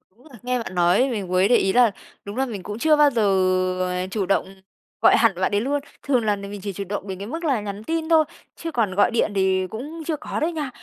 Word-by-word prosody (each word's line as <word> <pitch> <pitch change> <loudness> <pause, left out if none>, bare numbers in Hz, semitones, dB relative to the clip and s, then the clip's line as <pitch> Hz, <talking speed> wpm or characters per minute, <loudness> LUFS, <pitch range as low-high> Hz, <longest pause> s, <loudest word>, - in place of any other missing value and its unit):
Đúng 245 +5 -24
là 245 - -12
nghe 250 0 0
bạn 225 -5 -6
nói 180 +10 +3
mình 205 -5 -3
mới 185 +2 +3
để 245 - +4
ý 195 -3 +2
là 245 -3 +5 0.3
đúng 205 +4 -7
là 265 - +1
mình 210 -7 -6
cũng 210 +3 -6
chưa 310 +3 +4
bao 295 -1 +5
giờ, 235 -4 0 0.7
à, 180 +1 -2
chủ 205 -2 -1
động 195 +1 +1 0.5
gọi - - +6
hẳn 230 -2 +4
bạn 185 - +1
đấy 205 +1 +1
luôn, 285 +3 0 0.3
thường 250 -5 +2
là 210 -1 +2
mình 200 0 -8
chỉ 200 -1 -4
chủ 200 - -4
động 205 0 -4
đến 190 - -5
cái 200 - -6
mức 325 +8 -5
là 270 -9 +1
nhắn 205 +1 -6
tin 325 +4 -2
thôi, 320 -1 +5 0.3
chứ 330 -1 -6
còn 210 -8 0
gọi 205 - +3
điện 225 -2 +1
thì 190 -1 +1
cũng 295 - -7
chưa 320 - 0
có - - -5
đấy 320 +3 0
nha. 305 -5 -3
220 Hz, 265 wpm, -23 LUFS, 195-275 Hz, 0.7 s, gọi